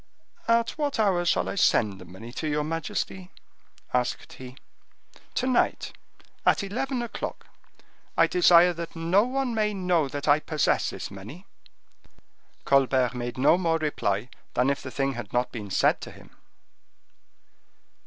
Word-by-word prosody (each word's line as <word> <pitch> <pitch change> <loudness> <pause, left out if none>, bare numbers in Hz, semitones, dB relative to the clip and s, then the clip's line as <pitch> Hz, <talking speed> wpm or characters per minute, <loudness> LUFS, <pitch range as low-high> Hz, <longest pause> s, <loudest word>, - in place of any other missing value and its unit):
"At 230 0 +3
what 290 -4 -1
hour 190 -5 +2
shall - - +1
I - - -2
send 105 - +2
the - - -10
money 95 +7 -11
to 155 - -3
your 150 0 0
majesty?" 165 +3 -4 0.6
asked 125 -1 -1
he. 130 0 -11 0.8
"To 255 - 0
night, 255 -1 +1 0.5
at - - +3
eleven 245 +5 -2
o'clock; 235 - -6 0.7
I - - +6
desire 180 - +5
that 170 0 -7
no 170 +6 +3
one 260 -1 -1
may 210 -2 0
know 180 -5 +1
that 145 +2 -5
I 145 +1 +5
possess 155 -1 0
this - - -7
money." 110 - -10 1.2
Colbert 130 -2 +3
made 120 0 -5
no 145 +7 +4
more 165 -3 +1
reply 125 -8 -1 0.3
than 125 +3 +3
if 140 - -3
the 130 - -7
thing 135 +1 -1
had 120 -5 -7
not 125 +1 0
been 105 -4 -7
said - - +2
to - - -7
him. - - -16
155 Hz, 150 wpm, -26 LUFS, 125-195 Hz, 1.2 s, I